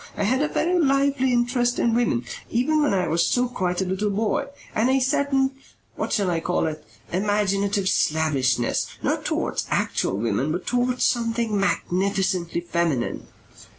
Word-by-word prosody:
I - - 0
had 255 +7 +2
a 300 - +2
very 350 +4 +1
lively 275 -3 +2
interest 245 0 +1
in 235 - +2
women, 225 - +1 0.2
even 300 +6 +1
when 295 - +2
I 185 -3 +1
was 165 +2 +2
still 250 0 +2
quite 185 -6 -2
a - - -4
little 190 +3 -1
boy, 220 +7 0 0.3
and 225 +4 +2
a 265 +1 +3
certain 270 +1 +1 0.4
what - - -3
shall 195 -4 +1
I 165 - 0
call 175 +1 0
it? 155 -1 -4 0.3
imaginative 200 0 0
slavishness 135 -9 +1 0.2
not - - -1
towards - - -1
actual 95 - 0
women 115 +7 0
but 175 +3 -3
towards 245 0 +1
something 230 -2 0
magnificently 190 -3 0
feminine. 170 -7 -1
205 Hz, 155 wpm, -24 LUFS, 170-250 Hz, 0.4 s, a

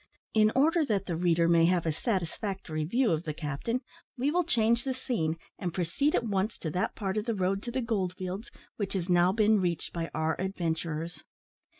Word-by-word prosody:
In 215 0 +5
order 320 +5 +4
that 200 -3 0
the 170 - -2
reader 170 0 +3
may 170 -1 +5
have 175 -1 +2
a 160 - +2
satisfactory 185 -3 -2
view 235 +8 +2
of 160 -1 +1
the 155 -3 -4
captain, 160 - -2 0.4
we 270 +4 +1
will 355 +2 +2
change 235 -5 +2
the 265 -1 -2
scene, 165 -11 -1 0.2
and 175 -4 -3
proceed 185 - +1
at - - +2
once 205 -1 -1
to 160 - -4
that 180 - -1
part 195 -1 -2
of 210 - -1
the 230 -2 0
road 195 +1 0
to 240 - -5
the 260 +2 -1
gold 200 -6 -1
fields 185 +5 -5 0.3
which 205 -3 -2
has 185 -2 -2
now 175 +1 +5
been 215 0 +4
reached 170 -3 -2
by 165 -1 -3
our 160 0 +1
adventurers. 165 -3 -3
190 Hz, 205 wpm, -29 LUFS, 170-225 Hz, 0.4 s, In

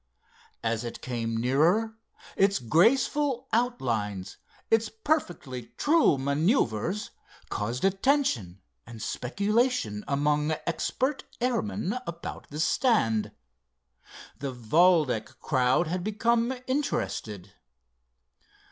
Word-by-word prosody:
As 115 0 -1
it 120 - -6
came 115 -2 -2
nearer 165 - +2 0.4
its 195 +1 +3
graceful 255 - +2
outlines, 115 - -1 0.3
its 225 -1 +3
perfectly 175 - -3
true 305 - +4
maneuvers, 145 - 0 0.4
caused 115 - -2
attention 195 - +1 0.3
and 115 -1 -10
speculation 200 - 0
among 150 +2 +1
expert 260 - -1
airmen 225 -3 -1
about 170 0 -7
the 150 - -6
stand. 155 - +2 1.1
The 140 -1 -3
Valdec 130 0 +2
crowd 130 +3 +2
had 175 +2 -3
become 230 +3 +1
interested. 105 - -2
165 Hz, 85 wpm, -27 LUFS, -, 1.1 s, true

